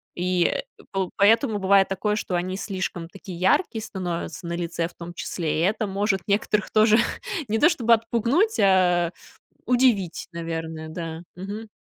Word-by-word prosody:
И, 180 0 +1
э, - - +1 0.3
пол 190 -2 -2
поэтому 220 +2 +4
бывает 195 0 +4
такое, 210 +2 -1
что 185 -4 -2
они 185 +2 -2
слишком 185 -4 -4
такие 185 -2 -9
яркие 220 - +2
становятся 175 -3 -5
на 170 - -3
лице 170 -1 -2
в 175 - -17
том 175 0 -9
числе, 165 -3 -2
и - - +2
это 210 +2 +1
может 195 -1 0
некоторых 205 +1 0
тоже 215 0 +5 0.5
не 220 +1 0
то, 335 - +6
чтобы 235 -8 +3
отпугнуть, 235 - +1
а 180 -3 +4 0.5
удивить, 240 -8 +2
наверное, 165 -1 -5
да, 165 0 -6
мгм. 205 +4 -6
190 Hz, 155 wpm, -24 LUFS, 175-215 Hz, 0.5 s, то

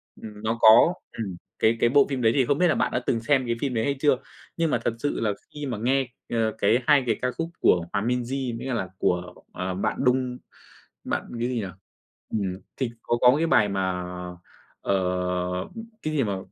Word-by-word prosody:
nó 110 +1 -4
có, 115 +10 +8 0.2
ừm, 100 -5 -4 0.2
cái 115 +1 +3
cái 120 - +4
bộ 140 +2 +5
phim 135 -3 -2
đấy 110 -1 +4
thì 135 -3 +3
không 140 +3 +1
biết 180 - +4
là 160 - +2
bạn - - +1
đã - - 0
từng 115 - +1
xem 130 +2 +2
cái 115 - 0
phim 135 -3 -1
đấy 110 -2 0
hay 140 +4 0
chưa? 145 -2 +4 0.4
Nhưng 165 -2 +1
mà - - +3
thật 120 - +1
sự 145 - -1
là 110 -2 +1 0.2
khi 150 -1 -5
mà 125 -5 -3
nghe, 130 +4 +1 0.2
ơ, 115 -2 +1
cái, 110 +3 +3
2 145 -3 +6
cái 115 - +2
ca 125 - 0
khúc 165 +6 -4
của 85 -2 +3
Hòa 100 - +1
Minzy 125 +1 -2
mới 125 - -6
cả 130 - -1
là 95 -6 -2
của, 90 -1 0 0.2
ờ, 90 0 -3
bạn 95 - -1
Đung, 125 0 +1 0.7
bạn - - -1 0.2
cái 120 - 0
gì 130 - -2
nhỉ? 110 -4 -1 0.7
Ừm, 95 -3 -2 0.2
thì 130 -3 -1
có 120 - 0
có 125 0 +7
cái 165 +2 +1
bài 105 -9 +4
mà, 95 -2 -1 0.8
ờ, - - 0 1.1
cái 155 - -3
gì 140 - +2
mà, 100 -3 -1
120 Hz, 220 wpm, -25 LUFS, 110-135 Hz, 1.1 s, có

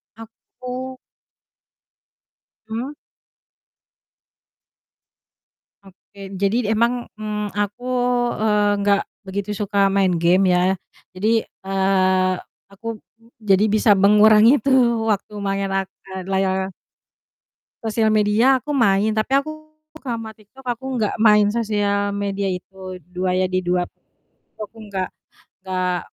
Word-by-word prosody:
Aku 250 +3 -9 1.7
Hmm. 245 +6 -4 2.9
Oke 195 +1 -20 0.2
jadi 200 +2 +2
d 205 - -3
emang, 235 +3 +2 0.3
mmm, 210 -1 -3
aku, 205 +4 -3 0.6
eee, 210 -1 +2
nggak 200 0 +3 0.3
begitu 200 +2 -4
suka 205 -1 -3 0.2
main 190 -3 +3
game 175 +3 +3
ya - - +3 0.6
jadi, 210 +4 0
eee, 190 -1 +1 0.4
aku 200 +4 -11 0.6
jadi 195 +2 +5
bisa 215 0 +4
mengurangi 210 +2 +7
itu 270 +5 -1 0.4
waktu 210 +1 -3
main 195 0 -1
ak 195 - 0 0.2
eee, 190 -1 -6
layar 190 0 0 1.1
Sosial 220 0 +1
media 230 +5 +3
aku 295 - -4
main 215 -5 +3
tapi 215 +5 0
aku 310 - -6 0.5
sama 230 -5 -5
TikTok 220 +5 -19
aku 255 +2 -4
nggak 220 -2 -1
main 210 -2 +5
sosial 205 -3 0
media 200 -1 -2
itu 185 0 -6 0.2
2 180 0 -1
ya 185 - +2
di 185 - +1
2, 180 0 0 0.7
itu - - -49
aku 225 - -29
enggak 195 -3 -4 0.4
enggak 185 -1 -2
205 Hz, 115 wpm, -21 LUFS, 190-220 Hz, 2.9 s, mengurangi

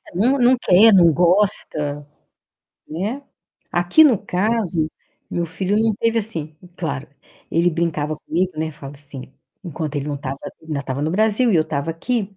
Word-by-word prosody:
Não, 250 +9 +2
ninguém 250 0 +4
quer, 205 +4 +6
não 170 -3 +6
gosta, 155 -5 +1 0.8
né. 210 - -4 0.5
Aqui 175 - +5
no 255 -7 +5
caso, 185 -5 -1 0.4
meu 170 - -1
filho 190 +4 -2
não 225 0 +2
teve 230 0 +1
assim, 160 -8 -5 0.2
claro, 145 -4 -4 0.4
ele 170 +2 +2
brincava 155 -2 -2
comigo, 180 +4 -2
né, 160 0 -2
fala 140 -1 -10
assim, 140 -2 -10 0.3
enquanto 155 -3 -4
ele 145 +1 -3
não 145 - -2
estava, 135 -1 -5 0.3
ainda 155 -3 -4
estava 135 +1 -4
no 155 - 0
Brasil 220 +4 +2
e - - +4
eu 155 - +4
estava 145 +1 -3
aqui, 200 +3 -3
170 Hz, 160 wpm, -20 LUFS, 150-210 Hz, 0.8 s, quer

